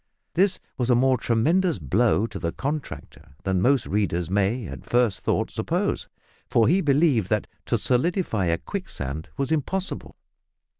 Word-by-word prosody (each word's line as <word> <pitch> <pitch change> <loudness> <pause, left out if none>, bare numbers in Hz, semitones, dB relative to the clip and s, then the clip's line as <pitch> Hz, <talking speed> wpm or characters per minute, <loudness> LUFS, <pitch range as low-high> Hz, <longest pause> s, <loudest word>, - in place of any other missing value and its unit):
This 190 +1 +3 0.2
was 125 0 0
a 125 - +5
more 130 +2 +4
tremendous 160 - +2
blow 100 - +2
to - - -6
the 85 - -2
contractor 140 - -6
than 95 -1 0
most 135 +3 +3
readers 90 -4 -1
may 100 +4 +1
at 70 -6 -8
first 120 -5 +1
thought - - 0
suppose, - - -1 0.4
for 115 - +4
he 180 +8 +4
believed 140 - +3
that 105 -1 +1 0.2
to - - +2
solidify 130 - +1
a 85 -1 +1
quicksand 80 - -5
was 140 +1 -1
impossible. 180 +5 -2
120 Hz, 150 wpm, -25 LUFS, 95-150 Hz, 0.4 s, a